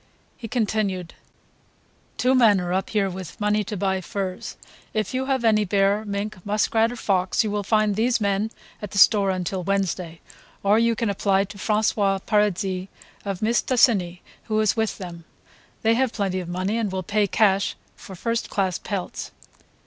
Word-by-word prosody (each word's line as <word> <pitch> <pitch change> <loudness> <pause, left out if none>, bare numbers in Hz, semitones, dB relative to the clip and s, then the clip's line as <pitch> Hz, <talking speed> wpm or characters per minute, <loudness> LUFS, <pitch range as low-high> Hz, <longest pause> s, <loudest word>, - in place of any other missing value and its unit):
He 230 - -8
continued: 205 -6 -1 1.0
"Two 255 +1 +3
men 225 -6 +5
are 180 0 -2
up 190 +1 -1
here 205 -3 +1
with 185 -2 -7
money 210 0 +1
to 210 +1 -4
buy 190 0 0
furs. 185 -1 -5 0.4
If 215 +1 -1
you 260 +1 -1
have 265 -3 0
any 215 -1 +4
bear, 200 +2 +1
mink, 200 -2 -4
muskrat 220 +2 +1
or - - -6
fox 190 -5 +1
you 215 - -2
will 205 0 -1
find 215 +1 +2
these 235 +3 +2
men 200 +1 0 0.3
at 210 - -5
the 200 - -6
store 200 0 +6
until 185 0 -2
Wednesday, 180 -3 -2 0.4
or 205 +2 +4
you 230 0 +2
can 225 -2 0
apply 195 0 +2
to 200 +1 -10
François 210 -2 +1
Paradis 195 -3 0 0.4
of 195 -2 -3
Mistassini 220 -6 +2 0.2
who 215 -1 0
is 215 -1 +2
with 220 -1 -1
them. 175 -3 -8 0.6
They 225 0 +4
have 255 0 +1
plenty 195 -3 -1
of 175 -2 -6
money 185 +5 -1
and 215 -4 -1
will 190 0 -3
pay 205 +3 +1
cash 200 0 +2 0.2
for 190 - -11
first 230 +5 -2
class 190 -3 -1
pelts." 195 -4 -5
205 Hz, 170 wpm, -24 LUFS, 190-220 Hz, 1.0 s, store